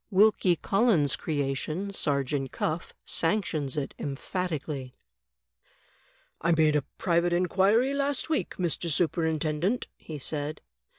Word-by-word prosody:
Wilkie 200 -3 +4
Collins' 190 - +2
creation, 155 +6 -2
Sergeant 140 -4 0
Cuflf, 160 +2 -2
sanctions 165 -7 0
it 140 - -2
emphatically: 145 -3 -4 1.5
"I 170 +1 +3
made 155 -2 +4
a 150 - +3 0.2
private 175 0 +2
inquiry 195 +9 +3
last 280 -1 0
week, 315 -1 -1
Mr. 175 -1 -1
Superintendent," 160 +4 0
he 155 - -8
said. 145 +2 -2
165 Hz, 105 wpm, -28 LUFS, 145-190 Hz, 1.5 s, Wilkie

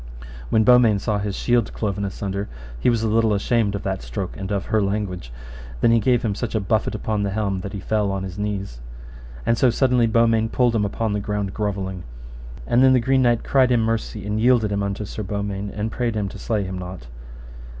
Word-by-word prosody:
When 110 - +3
Beaumains 120 -4 +5
saw 105 -3 0
his 100 -1 -3
shield 120 -3 +1
cloven 100 -2 -2
asunder 100 +1 -4 0.3
he - - +2
was 115 -2 +1
a - - +1
little 110 -1 +2
ashamed 105 0 +1
of 100 - -5
that 95 -2 -2
stroke - - -5
and 95 +1 -6
of 100 -4 -1
her 110 -1 +1
language; 100 - -3 0.4
and - - -13
then 115 - +4
he 115 - +5
gave 125 +1 +2
him 110 -3 0
such 115 +2 -4
a - - +3
buffet 110 +2 0
upon 105 -1 -2
the 100 - 0
helm 100 -2 -1
that 100 +2 -6
he 100 - -4
fell 105 -1 0
on 95 -1 -3
his 95 +1 -6
knees. 100 -11 -4 0.6
And 115 - +2
so 130 - +5
suddenly 125 -1 +3
Beaumains 115 0 +3
pulled 120 -2 +2
him 105 -2 +2
upon 110 +1 -2
the 105 - 0
ground 100 -1 -3
grovelling. 95 -3 -3 0.6
And 120 - +3
then 130 0 +6
the 130 - +5
Green 130 +2 +2
Knight 120 -2 +2
cried 130 -2 +3
him 120 -2 +3
mercy, 110 -2 -2
and 105 +1 -1
yielded 120 -3 +3
him 100 0 0
unto 100 +1 -3
Sir 110 - -6
Beaumains, 100 0 -3
and 110 +2 -2
prayed 120 -2 -1
him 105 -2 -1
to - - -10
slay 110 -3 -1
him 95 -1 -5
not. 90 -6 -8
105 Hz, 225 wpm, -22 LUFS, 100-115 Hz, 0.6 s, then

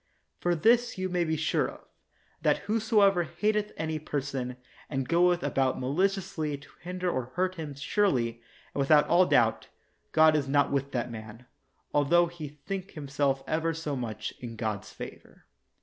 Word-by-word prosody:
For 175 0 +1
this 235 +8 +3
you 185 0 -2
may 175 -1 +1
be 160 -1 -1
sure 160 - +1
of, - - -13 0.6
that - - +3
whosoever 210 -3 +3
hateth 210 +5 0
any 160 -1 -2
per 150 -1 -2
son, 130 -2 -4 0.3
and 135 -2 -2
goeth 175 +1 +3
about 135 -1 +1
maliciously 155 +1 0
to 145 - -16
hinder 180 +1 -4
or 130 -8 0
hurt 185 +1 +1
him, 155 -5 -6
surely, 130 - 0 0.3
and - - -4
without 145 +2 +5
all 180 +1 +5
doubt, 115 -2 +3 0.4
God 155 0 +6
is 145 -3 0
not 145 +1 +2
with 140 0 -1
that 120 -1 -2
man, 110 +2 -9 0.5
altho 170 +4 +4
he 170 -3 -7
think 185 +7 -6
himself 140 -2 -1
ever 165 +1 0
30 150 -3 -3
much 110 -4 -4
in 120 -2 -7
God's 105 -2 -3
favor. - - -10
155 Hz, 165 wpm, -29 LUFS, 135-180 Hz, 0.6 s, God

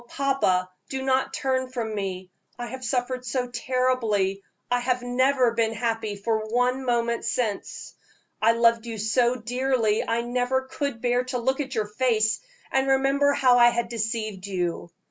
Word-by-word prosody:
papa, 265 -10 +1 0.2
do 265 -1 -3
not 265 0 +1
turn 260 -1 -1
from 235 -4 -3
me; 190 -3 -4 0.3
I 240 - -4
have 260 +2 -7
suffered 250 +1 -1
so 250 0 -2
terribly 235 -6 0 0.3
I 245 - +3
have 250 0 -1
never 255 0 +2
been 225 -1 +1
happy 225 -2 -2
for 220 +1 -1
one 250 +3 +1
moment 235 -2 0
since. 230 -3 -3 0.5
I 225 +1 +5
loved 230 0 +3
you 225 -1 -5
so 235 +3 +2
dearly 245 -2 0
I 230 +1 0
never 250 +2 0
could 260 -2 -4
bear 245 0 +2
to 255 0 -2
look 265 +3 0
at 270 -2 -3
your 215 -2 0
face 215 0 +1 0.3
and 265 0 +2
remember 275 +1 +3
how 250 -3 +4
I 240 0 +8
had 235 -1 -2
deceived 220 -4 -3
you. 175 -3 -2
240 Hz, 165 wpm, -25 LUFS, 220-255 Hz, 0.5 s, I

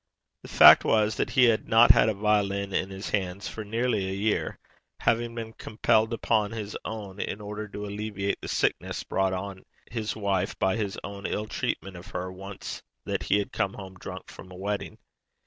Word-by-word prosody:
The - - -11
fact - - +9
was 110 -1 +2
that - - 0
he 130 +1 +4
had 115 -3 +3
not 115 +1 +8
had 110 - +4
a 110 - -1
violin 100 -1 +1
in 95 - 0
his 95 +1 -6
hands 95 -1 -1
for 110 - -6
nearly 110 -2 0
a 95 - -3
year, 105 +2 0 0.4
having 115 0 +1
been 115 -1 -5
compelled 110 0 +1
to 115 - -2
pawn 110 -3 +1
his 105 -2 -5
own 105 -3 -6
in 100 - -3
order 105 +1 -6
to 105 0 -6
alleviate 100 -1 -3
the - - -6
sickness - - 0
brought 95 -1 0
on 95 0 -5 0.3
his 110 -2 -2
wife 100 -2 -1
by 95 +1 +2
his 105 -2 -2
own 100 0 -5
ill 105 - -2
treatment 95 -3 -3
of 85 - -11
her, 90 +1 -4
once 95 +1 -7 0.2
that - - -1
he 100 0 +2
came 95 - -2
home 95 -2 -9
drunk 90 - -9
from 95 - -12
a - - -10
wedding. 100 +2 -3
105 Hz, 195 wpm, -27 LUFS, 95-110 Hz, 0.4 s, fact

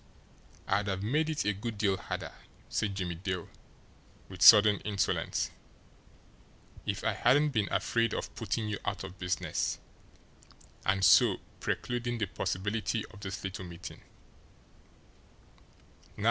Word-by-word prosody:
"I'd 100 +1 +1
have 95 0 -2
made 150 +8 +1
it 155 -1 -1
a 105 - +2
good 105 +2 -5
deal 100 -2 +2
harder," - - -5 0.4
said 100 -2 -1
Jimmie 90 -3 -2
Dale, 90 0 -4 0.8
with 95 -2 -10
sudden 105 0 +9
insolence, 100 -2 -1 1.4
"if - - -2
I - - +1
hadn't 145 +5 +4
been 110 -7 -1
afraid 115 0 +1
of - - -4
putting 110 -2 -2
you 105 -1 -3
out 100 -3 -3
of 95 +1 -9
business 90 -3 -1 1.1
and 95 0 +3
so 95 - +6 0.2
precluding 120 0 -2
the 110 - 0
possibility 105 +4 -2
of 105 - -13
this 100 -1 -6
little 95 -1 -5
meeting. 85 -1 -9
100 Hz, 125 wpm, -31 LUFS, 95-115 Hz, 1.4 s, sudden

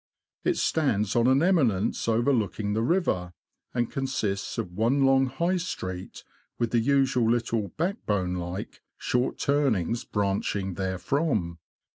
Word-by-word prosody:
It 355 -1 +1
stands 110 -10 +1
on 120 0 +4
an 135 +4 +4
eminence 130 - +2
over 120 +5 +2
looking 105 -2 -1
the 110 - 0
river, 115 - 0 0.4
and 120 -2 -1
consists 115 -8 -2
of 90 - -3
one 120 +8 +2
long 135 0 +4
High 170 +8 0
Street, 95 - -5 0.3
with 120 -2 -1
the 120 - +3
usual 130 -2 +2
little 115 -3 0
"backbone 105 - -1
like," 90 +3 -6 0.2
short 125 +1 0
turnings, 120 - +1
branching 100 -1 -1
therefrom. 95 - -1
115 Hz, 130 wpm, -27 LUFS, 100-135 Hz, 0.4 s, on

